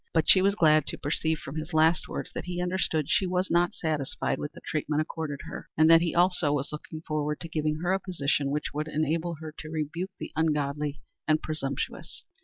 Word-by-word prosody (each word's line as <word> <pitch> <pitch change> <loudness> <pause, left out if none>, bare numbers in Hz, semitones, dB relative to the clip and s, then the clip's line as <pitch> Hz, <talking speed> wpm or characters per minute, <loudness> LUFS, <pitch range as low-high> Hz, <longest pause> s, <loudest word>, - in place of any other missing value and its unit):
But 160 - +4
she 185 - +7
was 200 +1 +3
glad 155 -5 +4
to - - -4
perceive 160 +2 0
from 145 +1 -7
his 155 +2 -4
last 160 0 +4
words - - -5
that - - -5
he 180 -1 -4
understood 180 -4 0
she 175 +4 +2
was 180 +1 0
not 175 +1 +3
satisfied 155 -4 -1
with 150 - -4
the - - -12
treatment 150 -1 -1
accorded 155 -3 -5
her, - - -8
and 155 +1 +6
that 165 0 +8
he 170 -1 -1
also 175 -3 +3
was 145 -1 -1
looking 155 +1 -7
forward 150 -1 -2
to 170 - -5
giving 155 -1 -1
her 180 +1 +2
a 195 - +1
position 145 -7 0
which 150 +1 -2
would 150 +2 -2
enable 160 +3 0
her 155 0 -8
to 155 - -7
rebuke 160 +4 -3
the - - -6
ungodly 150 -2 0 0.3
and 155 0 +2
presumptuous. 140 -4 -4
155 Hz, 210 wpm, -28 LUFS, 150-170 Hz, 0.3 s, that